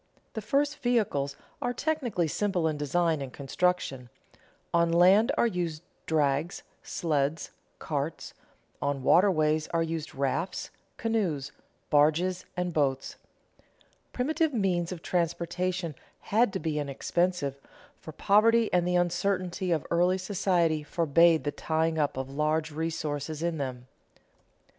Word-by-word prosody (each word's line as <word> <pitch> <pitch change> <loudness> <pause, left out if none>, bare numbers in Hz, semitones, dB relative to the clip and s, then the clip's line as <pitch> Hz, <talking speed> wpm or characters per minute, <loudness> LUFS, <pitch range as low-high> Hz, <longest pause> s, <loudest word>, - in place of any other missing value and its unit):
The 220 - -4
first 285 +7 0
vehicles 205 - 0 0.3
are 245 - -1
technically 250 - -1
simple 180 0 0
in 155 - -1
design 155 +2 0
and 135 -2 -5
construction; 140 -3 -1 0.6
on 170 0 +3
land 185 +6 +5
are - - +4
used 175 -7 -2 0.2
drags, 150 +1 0 0.2
sleds, 150 -1 -1 0.3
carts; 150 +1 -4 0.5
on 140 -2 -1
waterways 155 -3 +3
are 165 -1 0
used 165 -1 -4
rafts, 140 +7 -2 0.3
canoes, 180 -12 -1 0.4
barges, 165 +5 +3
and 180 -1 -1
boats. 135 -4 0 0.9
Primitive 305 +3 0
means 180 -5 0
of 175 -2 -7
transportation 175 0 -1 0.4
had 225 0 +4
to 190 - -2
be 155 -3 -2
inexpensive, 145 +1 -1 0.4
for 155 - -9
poverty 220 +6 +3
and 175 -1 +3
the 180 - +1
uncertainty 180 +1 0
of 160 -4 0
early 175 +2 +3
society 180 -5 +1
forbade 165 +1 +3
the 145 - -1
tying 160 +1 -1
up 145 -3 0
of 130 0 -3
large 155 +3 -1
resources 155 -1 -3
in 170 -2 -1
them. 125 -3 -4
170 Hz, 125 wpm, -28 LUFS, 150-185 Hz, 0.9 s, land